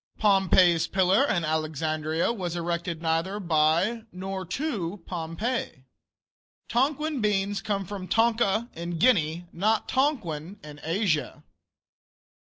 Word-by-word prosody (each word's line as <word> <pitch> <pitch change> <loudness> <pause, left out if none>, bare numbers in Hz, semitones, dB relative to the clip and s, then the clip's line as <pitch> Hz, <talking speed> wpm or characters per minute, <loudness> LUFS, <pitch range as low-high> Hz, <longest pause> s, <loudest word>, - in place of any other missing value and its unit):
Pompey's 190 -4 +4
Pillar, 190 +8 +3
in 175 -8 0
Alexandria, 155 - -1
was 180 -6 -4
erected 170 -1 -3
neither 165 +5 0
by 170 +6 +2
nor 190 0 -5
to 195 - -3
Pompey. 170 - -3 0.8
Tonquin 285 +3 0
beans 205 -1 0
come 200 -2 -2
from 190 0 -6
Tonka, 225 -1 +2
in 170 +1 -5
Guinea, 170 -6 +2
not 215 +5 +1
Tonquin, 205 - -1
in 150 -1 -10
Asia. 165 -2 -1
185 Hz, 105 wpm, -26 LUFS, 165-215 Hz, 0.8 s, Pompey's